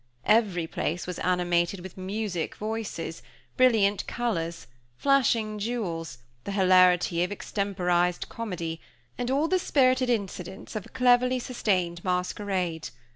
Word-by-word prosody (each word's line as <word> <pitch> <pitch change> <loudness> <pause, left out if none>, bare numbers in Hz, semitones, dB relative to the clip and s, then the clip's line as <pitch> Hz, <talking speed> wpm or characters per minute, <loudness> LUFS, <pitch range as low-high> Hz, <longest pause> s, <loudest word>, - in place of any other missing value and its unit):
Everyplace 180 -6 +1
was 180 -1 -5
animated 180 0 +1
with 185 0 -9
music 190 -2 -3
voices, 215 -6 -4 0.3
brilliant 220 -6 +3
colors, 170 -9 -2 0.3
flashing 235 -6 +2
jewels, 185 - -3 0.3
the 200 - -4
hilarity 185 -2 +4
of 180 - -2
extemporized 180 -4 0
comedy, 170 -8 -5 0.4
and 245 0 -1
all 280 +4 +2
the 370 +2 +2
spirited 255 -5 +3
incidents 195 -5 -3
of 215 - -4
a - - -18
cleverly 250 0 +3
sustained 185 -9 -1
masquerade. 180 -2 -2
195 Hz, 115 wpm, -27 LUFS, 175-230 Hz, 0.4 s, hilarity